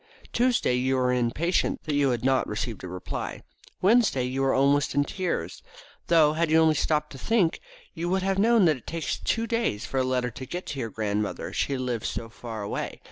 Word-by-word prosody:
Tuesday 245 - +2
you 130 +2 +1
were 125 -1 +2
impatient 125 +9 0
that 155 - -3
you 145 -1 +3
had 120 -1 -1
not 135 0 +2
received 110 0 -4
a - - -5
reply. 90 0 -5 0.4
Wednesday 210 - +4
you 130 +2 -2
were 135 0 +3
almost 140 +1 +2
in 145 - +4
tears, 180 +3 -3 0.5
though, 160 -3 +5
had 165 +1 0
you 160 - +5
only 160 -1 +5
stopped 150 0 0
to 135 - -9
think 205 - +1 0.3
you 170 +2 -3
would 190 +1 +1
have 195 0 0
known 225 -1 +5
that 155 -4 +3
it 125 - -19
takes 165 -1 -3
two 230 0 0
days 230 - -1
for 135 - -2
a - - +2
letter 125 -1 0
to 130 +3 -8
get 180 +1 -5
to 140 - -5
your 115 -3 -3
grandmother, 105 -1 -3
she 140 - 0
lives 125 -3 -2
so 115 - -5
far 115 -2 -7
away. 100 - -4
140 Hz, 210 wpm, -26 LUFS, 125-170 Hz, 0.5 s, though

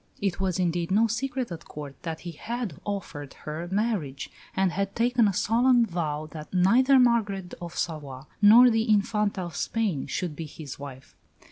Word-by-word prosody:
It 195 -3 -1
was, 190 -2 0
indeed, 175 -2 0
no 210 +4 +4
secret 250 +1 -2
at 165 - -7
Court 145 -2 -8
that 160 -2 -5
he 175 - -6
had 225 - -5
offered 170 -8 -5
her 155 +3 -4
marriage, 195 - -2 0.2
and 190 -2 +2
had 195 +2 -2
taken 240 -1 +3
a - - +2
solemn 235 +5 +3
vow 155 -5 -3
that 155 -1 -9
neither 240 +9 +5
Margaret 210 -7 +2
of 170 -1 -7
Savoy 145 -6 -4 0.2
nor 235 +4 +8
the 225 +1 0
Infanta 210 -1 +1
of 175 -2 -6
Spain 205 -12 -1
should 175 -5 -3
be 160 0 -6
his 145 -2 -9
wife. 135 -2 -10
190 Hz, 170 wpm, -26 LUFS, 160-225 Hz, 0.2 s, nor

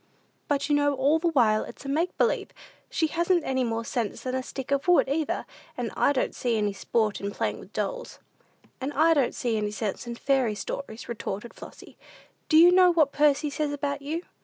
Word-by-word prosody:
"But 280 -1 0
you 295 - +1
know 290 -1 +2
all 280 +4 +2
the 340 - 0
while 230 -9 +3
it's - - -11
a - - -5
make 320 +6 -1
believe. 480 - +1 0.4
She 320 - 0
hasn't 340 +2 +1
any 260 -1 0
more 230 -1 -2
sense 235 -4 -3
than 255 - -3
a 260 - 0
stick 270 +1 -7
of 280 +4 0
wood, 355 -5 +5
either; 300 +3 -1 0.3
and - - -3
I - - +3
don't 265 - -1
see 235 -3 -1
any 210 -1 0
sport 215 +1 -1
in 200 - -2
playing - - -3
with - - -13
dolls." - - -4 0.6
"And 270 +2 -2
I 325 +3 +4
don't 280 -6 +1
see 235 -3 -1
any 210 -1 -1
sense 210 +2 -4
in 235 - -4
fairy 255 -4 +1
stories," 225 +1 -6
retorted 225 -1 -5
Flossy. - - -13 0.5
"Do 315 - +5
you 345 +2 +8
know 365 0 +6
what 310 -5 +3
Percy 295 0 +2
says 295 0 -2
about 285 0 -3
you? 315 +5 -4
280 Hz, 210 wpm, -26 LUFS, 235-310 Hz, 0.6 s, you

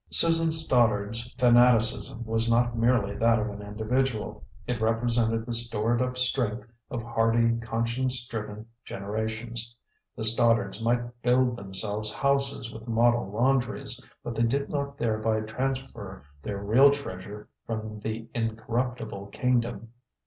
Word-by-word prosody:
Susan 165 0 +7
Stoddard's 115 -6 +2
fanaticism 120 -2 +3
was 115 +1 -1
not 120 +1 +2
merely 115 -4 +1
that 115 0 +3
of 110 0 -2
an 100 0 -9
individual; 110 +3 -2 0.2
it 120 -2 -3
represented 115 0 0
the 120 - -4
stored 115 0 +2
up 125 0 -2
strength 120 -4 -1 0.2
of 120 -2 -5
hardy, 115 0 +1
conscience 115 +2 -1
driven 105 -2 -7 0.2
generations. 110 +3 -5 0.4
The 115 - -5
Stoddards 110 -2 +5
might 120 +1 -2
build 125 0 +2
themselves 105 +1 -3
houses 140 -2 +1
with 110 +1 -11
model 120 -2 +2
laundries, 125 +2 0 0.2
but 120 - -5
they 115 - -2
did 135 +5 0
not 140 -1 -3
thereby 110 -2 0
transfer 110 - -5 0.2
their 100 +4 -5
real 110 +8 +5
treasure 105 -7 -6 0.2
from 110 -1 -5
the 110 +1 -5
incorruptible 115 -2 -3
kingdom. 120 +1 -1
115 Hz, 125 wpm, -26 LUFS, 110-125 Hz, 0.4 s, Susan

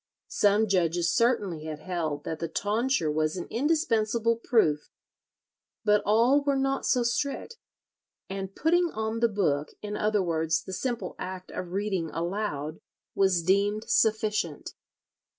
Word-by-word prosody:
Some 205 +2 +3
judges 175 -3 +1
certainly 205 -9 +1
had 155 -1 -5
held 155 -4 -3
that 160 0 -4
the 165 - -2
tonsure 210 - 0
was 155 +2 0
an 175 - -4
indispensable 230 -5 +1
proof; 215 -10 +1 1.0
but 210 -1 +4
all 235 +7 +4
were 280 -1 +1
not 270 0 0
so 250 -2 +3
strict, 280 - -2 0.7
and 195 0 -5
"putting 345 +2 +2
on 220 +1 -2
the 235 0 +3
book," 155 -8 0
in 210 0 -4
other 210 -2 +1
words, 160 -2 0
the 190 - -8
simple 235 -3 -3
act 185 0 -6
of 180 -1 -6
reading 195 -4 -1
aloud, 165 -4 -3 0.3
was 190 -3 +2
deemed 200 +4 +1
sufficient. 210 -7 +1
205 Hz, 135 wpm, -27 LUFS, 170-230 Hz, 1.0 s, but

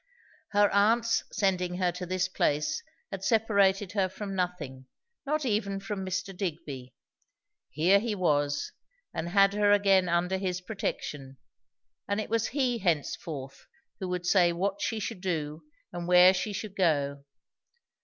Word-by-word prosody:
Her 205 0 +5
aunt's 225 +3 +3
sending 180 -3 0
her 180 -1 +1
to 180 +1 -6
this 185 +1 0
place 185 - 0 0.3
had 195 -1 -6
separated 200 -3 +2
her 195 -3 +1
from 195 +1 -6
nothing, 155 -9 -4 0.4
not 305 0 0
even 205 -4 0
from 195 0 -4
Mr. 190 +1 -3
Digby. 145 -8 -5 0.7
Here 175 +8 +4
he 220 0 -2
was, 145 -6 0 0.4
and 160 +1 -3
had 195 +1 +4
her 205 0 +3
again 195 -3 +4
under 175 +2 +1
his 185 -2 -2
protection; 150 -8 -5 0.7
and 200 +1 0
it 215 - -5
was 230 -1 +1
he 250 -3 0
henceforth 150 -5 -3 0.3
who 190 - -3
would 180 -1 -3
say 180 -2 +4
what 195 +4 -2
she 225 - -1
should 210 -2 -5
do 155 -4 -3 0.3
and 175 0 -5
where 180 +1 +7
she 185 +3 -2
should 200 0 -6
go. 145 -6 +1
185 Hz, 145 wpm, -28 LUFS, 170-205 Hz, 0.7 s, where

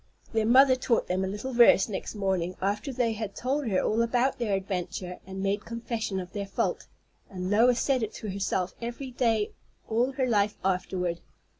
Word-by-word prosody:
Their 220 -1 +2
mother 260 +2 +7
taught 250 -2 +1
them 185 +1 -1
a - - -1
little 210 +7 -4
verse 235 -5 +6
next 210 0 -5
morning, 190 -3 -1
after 205 +8 -1
they 240 -3 0
had 215 -2 -5
told 270 +2 -1
her 190 -4 +2
all 225 +2 +1
about 245 +3 +1
their 215 -5 +1
adventure 185 -1 -4
and 190 0 -5
made 200 +2 0
confession 230 -4 -3
of 180 -1 -8
their 200 -2 -4
fault; 195 - -2 0.4
and 185 0 -4
Lois 235 +3 +4
said 265 -3 +1
it 220 -1 -2
to 210 - -5
herself 190 -1 -1
every 240 +3 -5
day 225 -4 +1 0.4
all 240 +4 +1
her 260 -1 0
life 210 -4 +1
afterward. 180 -2 -1
215 Hz, 185 wpm, -28 LUFS, 190-240 Hz, 0.4 s, mother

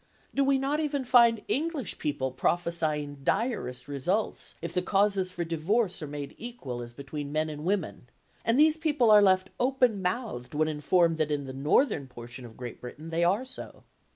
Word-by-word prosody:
Do 275 - +2
we 275 0 +3
not 275 +3 0
even 285 -3 -1
find 235 -3 +5
English 295 - -2
people 130 -3 -1
prophesying 155 0 0
direst 215 - -1
results 175 +10 -2
if 170 0 -5
the 180 - +1
causes 195 -1 +2
for 175 -1 -3
divorce 180 +5 0
are 150 - -4
made 145 -1 -6
equal 145 - -6
as 120 0 -9
between 140 +1 -6
men 155 +1 0
and 150 0 -7
women, 180 -8 -2 0.3
and 230 +4 +2
these 310 +1 +5
people 295 -8 +3
are 210 -1 +8
left 190 -1 +3
open 250 -5 +2
mouthed 180 - -3
when 155 +1 +2
informed 160 +2 +2
that 155 -1 +1
in 145 -2 -1
the 130 - -7
northern 145 - +2
portion 120 0 -10
of 115 -2 -13
Great 125 -1 -7
Britain 150 +6 -8
they 165 +1 +1
are 200 +9 +2
so? 255 - -8
175 Hz, 180 wpm, -28 LUFS, 145-235 Hz, 0.3 s, are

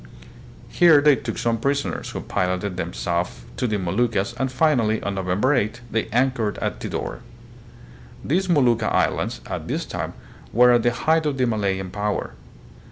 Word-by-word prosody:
Here 170 -4 +6
they 145 0 +5
took 115 -3 -5
some 115 -1 0
prisoners, 140 +3 -1
who - - -5
piloted 90 +1 -2
them 90 - -3
south 85 +2 -3
to 125 - -1
the 105 -2 0
Mo 90 -3 -3
luccas, 115 -2 +1
and 130 -1 0
finally, 130 -6 +2
on 100 - -2
November 95 +8 +1
8, 120 -2 0
they 110 -1 0
anchored 120 -2 0
at - - -3
Tidor. - - -4 1.1
These 185 +6 +1
Molucca 120 -9 +3
islands, - - 0
at - - -5
this - - -2
time, - - -5 0.4
were 125 +2 +6
at 120 -1 +4
the 120 - +3
height 160 +6 +1
of 140 -2 -1
the 130 - +2
Malayan 100 -5 -1
power. 105 +1 -2
115 Hz, 165 wpm, -23 LUFS, 100-130 Hz, 1.1 s, Here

